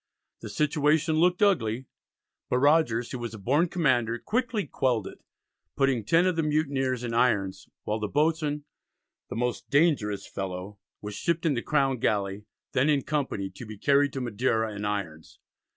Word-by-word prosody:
The -, -, -8 dB
situation 150 Hz, +1 st, +2 dB
looked 180 Hz, +4 st, +3 dB
ugly, 130 Hz, -, +2 dB, 0.6 s
but 125 Hz, -, +2 dB
Rogers, 125 Hz, -5 st, +3 dB
who 130 Hz, -, -4 dB
was 120 Hz, -1 st, -5 dB
a -, -, -7 dB
born 140 Hz, -, +2 dB
commander, 125 Hz, -9 st, +1 dB
quickly 230 Hz, -, -1 dB
quelled 125 Hz, -7 st, 0 dB
it, -, -, -9 dB, 0.6 s
putting 135 Hz, -5 st, +1 dB
ten 165 Hz, -, +3 dB
of 185 Hz, -2 st, +2 dB
the 165 Hz, -, +1 dB
mutineers 140 Hz, -5 st, 0 dB
in 120 Hz, -1 st, -3 dB
irons, 105 Hz, -6 st, +1 dB, 0.2 s
while 105 Hz, +1 st, -2 dB
the 105 Hz, -, -2 dB
boatswain, 150 Hz, +2 st, 0 dB, 0.7 s
"the -, -, -5 dB
most 125 Hz, +1 st, -2 dB
dangerous 130 Hz, -, +2 dB
fellow," 95 Hz, +1 st, -6 dB, 0.2 s
was 105 Hz, 0 st, -6 dB
shipped 170 Hz, +9 st, -1 dB
in 155 Hz, -, +3 dB
the 120 Hz, -, -1 dB
Crown 135 Hz, -3 st, +1 dB
galley, 100 Hz, -1 st, -1 dB, 0.3 s
then 130 Hz, +4 st, +2 dB
in 140 Hz, -3 st, +2 dB
company, 130 Hz, -10 st, -2 dB
to 95 Hz, -, -10 dB
be 110 Hz, -2 st, -9 dB
carried 140 Hz, +5 st, +3 dB
to 135 Hz, -, -3 dB
Madeira 110 Hz, -2 st, 0 dB
in 105 Hz, +1 st, -4 dB
irons. 90 Hz, -7 st, -4 dB
130 Hz, 170 wpm, -27 LUFS, 110-150 Hz, 0.7 s, looked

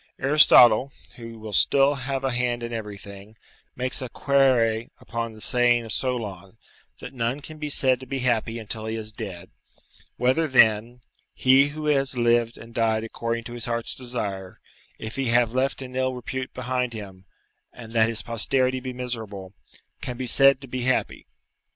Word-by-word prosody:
Aristotle, 135 Hz, -3 st, +6 dB, 0.3 s
who 115 Hz, -1 st, -9 dB
will 110 Hz, -1 st, -9 dB
still 140 Hz, +8 st, +4 dB
have 135 Hz, 0 st, -4 dB
a 135 Hz, -, 0 dB
hand 120 Hz, -1 st, -1 dB
in 120 Hz, 0 st, -5 dB
everything, 105 Hz, -1 st, -9 dB, 0.4 s
makes 125 Hz, +1 st, 0 dB
a 130 Hz, -, -5 dB
'quaere' 120 Hz, -5 st, +2 dB
upon 115 Hz, -1 st, -5 dB
the 110 Hz, -, -13 dB
saying 120 Hz, -1 st, +4 dB
of 110 Hz, -, -7 dB
Solon, 110 Hz, -6 st, -4 dB, 0.4 s
that -, -, -9 dB
none 120 Hz, +2 st, -2 dB
can 155 Hz, +1 st, -11 dB
be 150 Hz, -1 st, -4 dB
said 130 Hz, -3 st, +3 dB
to 130 Hz, -, -11 dB
be 135 Hz, -, -3 dB
happy 120 Hz, -3 st, -1 dB
until 110 Hz, 0 st, -5 dB
he 110 Hz, -, -3 dB
is 110 Hz, -1 st, -6 dB
dead: 95 Hz, -4 st, -8 dB, 0.7 s
"whether, 130 Hz, +6 st, +1 dB
then, 120 Hz, -2 st, +3 dB, 0.3 s
he 135 Hz, +2 st, +4 dB
who 150 Hz, +1 st, -7 dB
has 135 Hz, -3 st, +2 dB
lived 120 Hz, -1 st, +1 dB
and 115 Hz, +1 st, -13 dB
died 110 Hz, -1 st, 0 dB
according 115 Hz, +1 st, -4 dB
to 120 Hz, -, -9 dB
his 120 Hz, -1 st, -5 dB
heart's 115 Hz, -1 st, -3 dB
desire, 105 Hz, -7 st, -5 dB, 0.4 s
if 110 Hz, +3 st, -8 dB
he 135 Hz, -1 st, -1 dB
have 120 Hz, -1 st, +2 dB
left 135 Hz, +1 st, -1 dB
an 125 Hz, 0 st, -10 dB
ill 130 Hz, 0 st, -1 dB
repute 130 Hz, +1 st, -5 dB
behind 125 Hz, -1 st, -3 dB
him, 95 Hz, -4 st, -10 dB, 0.5 s
and 115 Hz, -2 st, -12 dB
that 115 Hz, -1 st, +3 dB
his 110 Hz, -2 st, -4 dB
posterity 130 Hz, +3 st, 0 dB
be 130 Hz, 0 st, -6 dB
miserable, 110 Hz, -6 st, -6 dB, 0.5 s
can 125 Hz, -1 st, -6 dB
be 130 Hz, -, -4 dB
said 135 Hz, +2 st, +5 dB
to 135 Hz, -, -10 dB
be 130 Hz, 0 st, -4 dB
happy?" 130 Hz, +1 st, -1 dB
120 Hz, 175 wpm, -24 LUFS, 110-130 Hz, 0.7 s, Aristotle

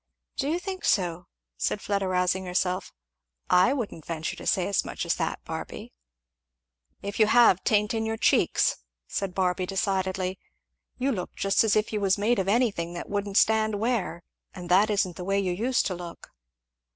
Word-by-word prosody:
"Do 275 Hz, -, -1 dB
you 330 Hz, -, +1 dB
think 375 Hz, 0 st, -6 dB
so?" 175 Hz, -2 st, 0 dB, 0.3 s
said 205 Hz, -, -1 dB
Fleda 200 Hz, -1 st, -1 dB
rousing 180 Hz, 0 st, +1 dB
herself. 180 Hz, +1 st, -1 dB, 0.6 s
"I 180 Hz, +8 st, +5 dB
wouldn't 230 Hz, -, -3 dB
venture 160 Hz, 0 st, -4 dB
to -, -, -8 dB
say 185 Hz, -4 st, +2 dB
as 200 Hz, -, +1 dB
much -, -, -5 dB
as -, -, +1 dB
that, -, -, -3 dB
Barby." -, -, -7 dB, 1.1 s
"If 200 Hz, +2 st, -5 dB
you 215 Hz, -, +6 dB
have, 230 Hz, -5 st, +5 dB
'tain't 210 Hz, 0 st, +2 dB
in 225 Hz, -1 st, -1 dB
your 225 Hz, 0 st, -2 dB
cheeks," -, -, +2 dB, 0.3 s
said 195 Hz, -2 st, -3 dB
Barby 180 Hz, -1 st, 0 dB
decidedly. 190 Hz, -1 st, -1 dB, 0.6 s
"You 270 Hz, +2 st, 0 dB
look 190 Hz, -8 st, -4 dB
just 195 Hz, +2 st, +2 dB
as 220 Hz, -2 st, +2 dB
if 215 Hz, +1 st, 0 dB
you 210 Hz, -, -1 dB
was 195 Hz, 0 st, +2 dB
made 220 Hz, +3 st, +1 dB
of 190 Hz, -, -1 dB
anything 200 Hz, -6 st, +1 dB
that 175 Hz, -, -7 dB
wouldn't 200 Hz, 0 st, -1 dB
stand 220 Hz, -1 st, +3 dB
wear, 205 Hz, -6 st, -1 dB, 0.3 s
and 180 Hz, -2 st, -8 dB
that 195 Hz, +4 st, +5 dB
isn't 195 Hz, -4 st, 0 dB
the 180 Hz, -, -5 dB
way 195 Hz, +2 st, 0 dB
you 190 Hz, -2 st, 0 dB
used 235 Hz, +8 st, 0 dB
to 185 Hz, -, -1 dB
look." 175 Hz, -1 st, -9 dB
195 Hz, 180 wpm, -26 LUFS, 180-220 Hz, 1.1 s, you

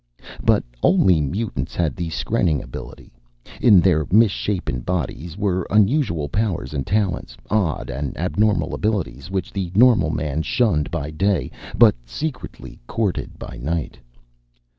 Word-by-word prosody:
But -, -, +3 dB, 0.2 s
only 90 Hz, -5 st, +4 dB
mutants 75 Hz, -, -3 dB
had 80 Hz, -6 st, 0 dB
the 85 Hz, -1 st, -3 dB
skrenning 85 Hz, -1 st, 0 dB
ability. -, -, -10 dB, 0.5 s
In 105 Hz, -6 st, +7 dB
their 85 Hz, -5 st, +2 dB
misshapen 100 Hz, -, +2 dB
bodies 85 Hz, +2 st, -4 dB
were 95 Hz, -4 st, -1 dB
unusual 105 Hz, -, +2 dB
powers 90 Hz, -5 st, -2 dB
and 70 Hz, -3 st, -3 dB
talents, 95 Hz, -, -1 dB
odd 100 Hz, -12 st, 0 dB
and 70 Hz, +2 st, -4 dB
abnormal 100 Hz, -1 st, +1 dB
abilities 95 Hz, -, -2 dB
which 95 Hz, -2 st, -3 dB
the 95 Hz, -3 st, -3 dB
normal 110 Hz, -8 st, +5 dB
man 75 Hz, -1 st, -2 dB
shunned 80 Hz, -5 st, +1 dB
by 75 Hz, -3 st, -4 dB
day 85 Hz, -3 st, 0 dB, 0.3 s
but -, -, +7 dB
secretly 130 Hz, -, -6 dB
courted 105 Hz, -5 st, -2 dB
by -, -, -9 dB
night. 80 Hz, +1 st, -3 dB
90 Hz, 130 wpm, -21 LUFS, 75-105 Hz, 0.5 s, In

